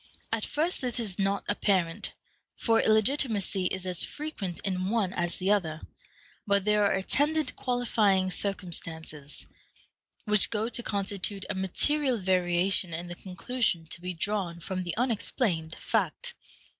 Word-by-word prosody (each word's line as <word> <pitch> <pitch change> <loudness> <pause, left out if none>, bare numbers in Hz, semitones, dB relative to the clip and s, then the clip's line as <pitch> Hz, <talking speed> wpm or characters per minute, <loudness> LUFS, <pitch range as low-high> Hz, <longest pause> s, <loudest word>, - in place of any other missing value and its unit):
At 225 -1 0
first 320 +5 0
this 250 -2 -2
is 205 -5 -4
not 195 0 +1
apparent, 195 -3 +1 0.4
for 225 -1 +3
illegitimacy 215 -4 +2
is 185 0 -3
as 180 -2 +2
frequent 210 - -4
in 185 -1 -1
one 205 -4 +1
as 175 -1 -1
the 190 +2 +1
other; 160 -7 +1 0.7
but 200 -1 +3
there 210 0 +4
are - - +2
attendant 295 +10 +1
qualifying 215 -7 +2
circumstances, 165 -7 -3 0.8
which 210 -2 +4
go 220 +1 -1
to 240 - -1
constitute 200 -2 -1
a - - 0
material 255 +8 +1
variation 180 -2 +3
in 175 +2 -5
the 175 - -5
conclusion 185 -1 -1
to 175 - -3
be 180 0 -4
drawn 180 -2 -1
from 185 +2 -3
the 175 +1 -4
unexplained 210 - 0
fact. - - -1
195 Hz, 140 wpm, -29 LUFS, 180-225 Hz, 0.8 s, there